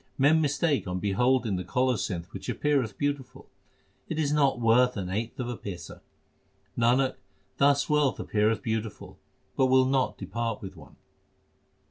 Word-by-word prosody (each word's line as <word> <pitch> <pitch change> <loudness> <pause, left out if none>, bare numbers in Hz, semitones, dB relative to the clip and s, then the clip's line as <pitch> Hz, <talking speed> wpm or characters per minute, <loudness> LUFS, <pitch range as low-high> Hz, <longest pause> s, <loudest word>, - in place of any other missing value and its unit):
Men 150 +4 +4
mistake 145 - 0
on 90 0 -2
beholding 110 +2 +1
the 90 - -4
colocynth 95 -3 -1
which - - -7
appeareth 135 -8 0
beautiful 145 -3 -3 0.6
It 160 - -3
is 150 -2 +1
not 140 -4 +2
worth 120 +1 +3
an 95 -2 -4
eighth 115 +5 -3
of 125 - -2
a 120 - -3
paisa; 90 -6 -8 0.7
Nanak, 125 +3 +2 0.4
thus 140 0 +3
wealth 150 -3 +2
appeareth 110 +1 0
beautiful, 110 -2 -4 0.4
but 130 - +3
will 130 0 +5
not 130 0 0
depart 115 +3 -3
with 95 -1 -9
one. 80 - -15
125 Hz, 145 wpm, -27 LUFS, 105-135 Hz, 0.7 s, will